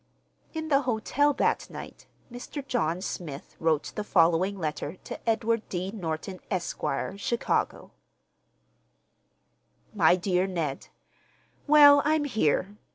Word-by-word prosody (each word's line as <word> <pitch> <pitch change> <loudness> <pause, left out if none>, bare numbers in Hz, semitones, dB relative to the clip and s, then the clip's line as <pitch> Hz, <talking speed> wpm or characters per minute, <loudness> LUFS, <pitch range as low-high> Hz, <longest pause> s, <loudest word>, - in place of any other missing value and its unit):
In 315 0 -4
the 275 -1 +4
hotel 260 +4 +1
that - - 0
night, - - -10 0.2
Mr. 255 +3 -7
John 180 -9 0
Smith 155 -7 -6
wrote 160 -2 0
the 210 - -3
following 185 +1 +2
letter 155 -1 -4
to - - -5
Edward 225 0 +1
D. 185 +1 -3
Norton, 185 -1 -5
Esq., 185 -4 -3 0.4
Chicago: 235 +3 -1 2.0
MY 175 -4 +5
DEAR 185 0 0
NED,—Well, 285 - +2
I'm 305 0 +2
here. 210 - 0
200 Hz, 105 wpm, -27 LUFS, 170-245 Hz, 2.0 s, MY